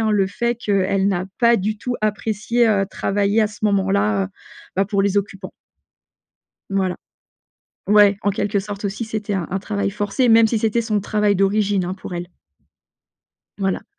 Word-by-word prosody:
hein, 220 Hz, -1 st, +1 dB
le 200 Hz, -2 st, +2 dB
fait 235 Hz, +4 st, -2 dB
qu'elle 195 Hz, -3 st, +1 dB
n'a 185 Hz, -2 st, 0 dB
pas 235 Hz, 0 st, +5 dB
du 210 Hz, +3 st, -2 dB
tout 250 Hz, +3 st, -3 dB
apprécié, 215 Hz, +2 st, 0 dB
heu, 200 Hz, -2 st, +2 dB
travailler 200 Hz, +2 st, 0 dB
à 215 Hz, -, +3 dB
ce 210 Hz, +1 st, -11 dB
moment-là, 195 Hz, -, +2 dB
heu, -, -, -6 dB, 0.5 s
bah, 195 Hz, -, +2 dB
pour 200 Hz, 0 st, 0 dB
les 200 Hz, 0 st, 0 dB
occupants. 195 Hz, -1 st, -3 dB, 1.2 s
Voilà. 190 Hz, -2 st, 0 dB, 0.9 s
Ouais, 205 Hz, -1 st, +5 dB
en 205 Hz, -, +2 dB
quelque 205 Hz, +1 st, -1 dB
sorte 205 Hz, +1 st, -6 dB
aussi 205 Hz, +4 st, -3 dB
c'était 215 Hz, -1 st, -4 dB
un 185 Hz, -4 st, -2 dB
un 190 Hz, -, -1 dB
travail 200 Hz, 0 st, -2 dB
forcé. 205 Hz, +5 st, 0 dB
Même 225 Hz, 0 st, +6 dB
si 225 Hz, -, 0 dB
c'était 225 Hz, +2 st, +1 dB
son 215 Hz, -2 st, 0 dB
travail 210 Hz, 0 st, +1 dB
d'origine, 195 Hz, 0 st, +1 dB
hein, 180 Hz, +1 st, -3 dB
pour 190 Hz, -2 st, -8 dB
elle. 175 Hz, 0 st, -4 dB, 1.3 s
Voilà. 195 Hz, -1 st, -1 dB
205 Hz, 170 wpm, -20 LUFS, 195-215 Hz, 1.3 s, Même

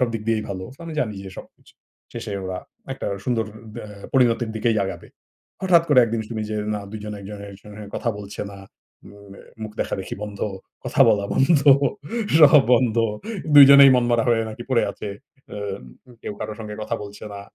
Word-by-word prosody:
সবদিক 115 Hz, -3 st, -1 dB
দিয়েই 110 Hz, -1 st, 0 dB
ভালো 95 Hz, -1 st, -5 dB
সো -, -, -23 dB
আমি 165 Hz, -, -6 dB
জানি 110 Hz, -7 st, -2 dB
যে -, -, -8 dB
সবকিছু। -, -, -15 dB, 0.4 s
শেষে 115 Hz, -3 st, -6 dB
ওরা 95 Hz, 0 st, -4 dB, 0.3 s
একটা -, -, -6 dB, 0.2 s
সুন্দর 120 Hz, -3 st, 0 dB, 0.3 s
দা 115 Hz, -, -7 dB, 0.3 s
পরিণতির 120 Hz, -3 st, +3 dB
দিকেই 110 Hz, 0 st, +1 dB
আগাবে। 95 Hz, -, -7 dB, 0.5 s
হঠাৎ 175 Hz, -3 st, +5 dB
করে 145 Hz, -4 st, +5 dB
একদিন 115 Hz, 0 st, -2 dB
শুনি 110 Hz, -2 st, -4 dB
যে 110 Hz, -, -2 dB, 0.2 s
না 105 Hz, -, -3 dB
দুইজন 105 Hz, -1 st, -6 dB
একজনের 100 Hz, 0 st, -9 dB
সঙ্গে 105 Hz, 0 st, -11 dB
কথা -, -, -2 dB
বলছে 100 Hz, 0 st, -8 dB
না। 100 Hz, -, -11 dB, 0.5 s
উম 100 Hz, -1 st, -14 dB
আ -, -, -15 dB, 0.2 s
মুখ 110 Hz, -, -6 dB
দেখাদেখি 95 Hz, -, -3 dB
বন্ধ। 105 Hz, -1 st, -7 dB, 0.4 s
কথা -, -, -2 dB
বলা 100 Hz, -1 st, +2 dB
বন্ধ, 140 Hz, +2 st, +4 dB, 0.8 s
সব 150 Hz, -2 st, +8 dB
বন্ধ। 120 Hz, -2 st, +1 dB, 0.6 s
দুইজনেই 140 Hz, -1 st, +10 dB
মনমরা 120 Hz, -1 st, +2 dB
হয়ে 115 Hz, -1 st, +3 dB
নাকি 110 Hz, +2 st, -8 dB
পড়ে 125 Hz, -, +3 dB
আছে। 105 Hz, -, -7 dB, 0.5 s
উম 100 Hz, -, -8 dB
কেউ -, -, -5 dB
কারো -, -, -4 dB
সঙ্গে 105 Hz, -1 st, -7 dB
কথা -, -, -3 dB
বলছে 105 Hz, +1 st, -10 dB
না। 100 Hz, -, -7 dB
110 Hz, 175 wpm, -22 LUFS, 100-120 Hz, 0.8 s, দুইজনেই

